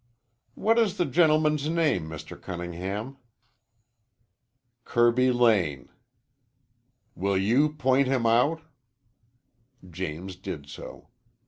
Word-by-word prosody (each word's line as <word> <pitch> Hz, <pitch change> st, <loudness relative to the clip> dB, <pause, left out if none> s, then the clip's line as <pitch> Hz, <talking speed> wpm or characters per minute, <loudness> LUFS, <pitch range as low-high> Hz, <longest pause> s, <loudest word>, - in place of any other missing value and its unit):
"What 225 Hz, +2 st, +2 dB
is 215 Hz, -5 st, +1 dB
the 175 Hz, -, +1 dB
gentleman's 155 Hz, -1 st, +2 dB
name, 155 Hz, -, 0 dB
Mr. 80 Hz, -2 st, -8 dB
Cunningham?" 95 Hz, +8 st, -6 dB, 1.7 s
"Kirby 120 Hz, +2 st, +3 dB
Lane." 105 Hz, -, +1 dB, 1.2 s
"Will 100 Hz, +1 st, -1 dB
you 125 Hz, +11 st, +2 dB
point 135 Hz, -2 st, +2 dB
him 130 Hz, -3 st, 0 dB
out?" 125 Hz, +8 st, +2 dB, 1.3 s
James 90 Hz, +2 st, -6 dB
did 75 Hz, -6 st, -7 dB
so. 70 Hz, -, -11 dB
120 Hz, 90 wpm, -26 LUFS, 95-150 Hz, 1.7 s, Kirby